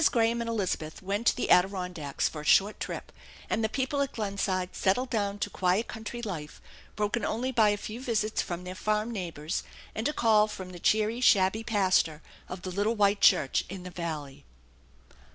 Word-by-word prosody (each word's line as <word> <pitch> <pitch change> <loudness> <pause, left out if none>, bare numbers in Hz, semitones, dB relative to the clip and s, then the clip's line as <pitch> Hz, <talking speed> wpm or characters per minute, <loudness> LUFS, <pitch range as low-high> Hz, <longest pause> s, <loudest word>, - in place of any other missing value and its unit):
Graham 230 0 +2
and 230 - -3
Elizabeth 185 -7 -2
went 200 +4 -1
to - - +5
the - - -2
Adiron 180 0 +3
dacks 145 -5 -1
for 150 - -6
a - - -10
short 195 +7 +4
trip, - - -5 0.4
and 225 - +1
the 220 - +1
people 270 +4 -1
at 275 - -1
Glenside 195 -3 -2
settled 245 +7 +1
down 205 -3 0
to 205 - -2
quiet 185 +4 +1
country 225 +2 -6
life, 160 -8 -5 0.4
broken 210 +2 -1
only 245 +5 -1
by 220 -4 +4
a 205 - +1
few 215 +4 -7
visits 220 -4 0
from 175 0 -5
their 180 0 -6
farm 215 +4 -1
neighbors, 170 -5 -3 0.3
and 220 +3 -1
a 300 - -1
call 215 -4 +4
from 185 -3 -7
the 175 - -9
cheery, 220 +5 +2
shabby 205 -2 +4
pastor 185 -8 +2 0.3
of 180 0 -7
+.he 185 - -4
little 210 +3 +1
white 205 -1 +3
church 135 -3 +4
in 190 0 -7
the 180 - -8
valley. 155 -6 -5
205 Hz, 190 wpm, -29 LUFS, 180-225 Hz, 0.4 s, to